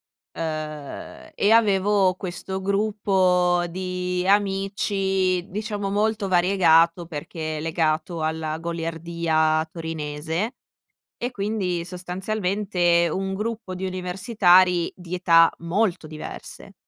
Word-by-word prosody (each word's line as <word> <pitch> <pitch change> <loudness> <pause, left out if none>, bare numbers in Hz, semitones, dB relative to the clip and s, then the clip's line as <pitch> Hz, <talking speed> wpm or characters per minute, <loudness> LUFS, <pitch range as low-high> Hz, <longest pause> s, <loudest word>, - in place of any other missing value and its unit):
uhm, 155 - -7
e 205 - +2
avevo 200 -3 +4
questo 190 +1 -5
gruppo 190 -3 +2
di 180 0 -3
amici, 195 -2 +1
diciamo, 205 0 -3
molto 210 0 0
variegato, 175 -2 +4
perché 155 0 -5
legato 160 +1 -1
alla 155 0 -2
goliardia 165 -1 -1
torinese. 160 +4 -3 0.7
E 245 +2 -2
quindi, 200 -5 -2
sostanzialmente, 180 -1 0
un 190 +2 -2
gruppo 215 -1 -4
di 185 +1 -3
universitari 185 -1 +3
di 180 -1 -6
età 165 -2 +5
molto 180 +1 0
diverse. 155 0 -9
180 Hz, 90 wpm, -24 LUFS, 165-195 Hz, 0.7 s, età